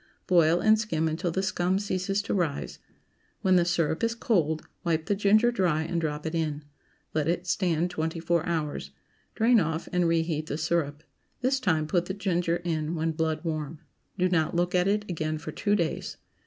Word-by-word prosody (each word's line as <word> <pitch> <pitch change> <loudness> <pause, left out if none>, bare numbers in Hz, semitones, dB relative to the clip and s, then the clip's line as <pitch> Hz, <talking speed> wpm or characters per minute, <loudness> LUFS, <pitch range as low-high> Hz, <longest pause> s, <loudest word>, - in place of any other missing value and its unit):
Boil, 170 -1 +4
and 215 +2 +4
skim 160 -8 0
until 160 +3 -1
the 190 +3 -1
scum 185 -1 +1
ceases 195 0 -1
to - - -2
rise. 165 -7 -2 0.6
When 185 -1 +4
the 175 -1 +4
syrup 165 -1 0
is 230 0 +1
cold, 160 -10 0 0.2
wipe 160 -2 0
the 205 - +1
ginger 210 +4 +4
dry 175 -8 +1
and 170 +1 -2
drop 150 -1 -3
it 160 - -3
in. 155 -3 -2 0.5
Let 155 -1 0
it 175 +1 0
stand 175 -2 0
twenty 165 -1 -2
four 170 0 +1
hours. 150 - -2 0.5
Drain 230 +1 +5
off 160 -2 -2
and 180 -1 +3
reheat 160 -2 0
the 145 - -3
syrup. 160 -2 -1 0.4
This 265 +1 +2
time 160 -10 +1
put 175 +3 +1
the 190 - -3
ginger 175 -4 0
in 160 -1 -1
when 165 0 0
blood 160 0 -1
warm. 155 -2 -3 0.4
Do 185 -1 +3
not 165 -3 +1
look 175 +1 +1
at 180 0 +3
it 205 +1 +1
again 155 -3 -2
for 155 - -7
two 205 0 +1
days. 170 -6 -2
170 Hz, 190 wpm, -27 LUFS, 160-185 Hz, 0.6 s, Drain